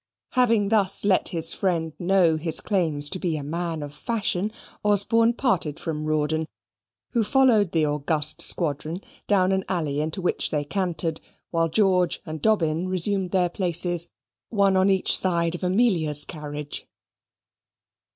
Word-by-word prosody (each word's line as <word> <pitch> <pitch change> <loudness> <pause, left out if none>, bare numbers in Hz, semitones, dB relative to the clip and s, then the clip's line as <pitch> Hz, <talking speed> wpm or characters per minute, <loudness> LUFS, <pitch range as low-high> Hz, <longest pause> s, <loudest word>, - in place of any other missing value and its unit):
Having 230 -5 +2
thus 200 -3 +1
let 195 -2 +3
his 165 -1 +2
friend 165 -4 -1
know 180 -2 +3
his 160 0 +1
claims 160 -8 0
to 185 - -3
be 170 -4 -1
a 145 - -5
man 165 +1 -3
of 145 0 -8
fashion, 210 +1 -2 0.3
Osborne 225 +3 +3
parted 185 - -1
from 155 -2 -4
Rawdon, 155 +1 0 0.6
who 235 -2 +1
followed 220 -5 +3
the 160 -2 +2
august 150 +1 0
squadron 160 +2 0 0.3
down 190 -2 +3
an 190 0 0
alley 155 -6 -1
into 155 +4 -3
which 180 - -1
they 150 -1 -1
cantered, 170 -1 -2 0.3
while 165 -1 +1
George 185 -1 +2
and 155 -1 -6
Dobbin 175 -5 +1
resumed 185 +1 0
their 180 -1 +2
places, 175 -1 0 0.4
one 200 -3 +2
on 190 +1 +3
each 190 -1 +2
side 170 -3 0
of 175 - -6
Amelia's 180 -7 +1
carriage. 150 -2 -7
175 Hz, 145 wpm, -24 LUFS, 155-195 Hz, 0.6 s, let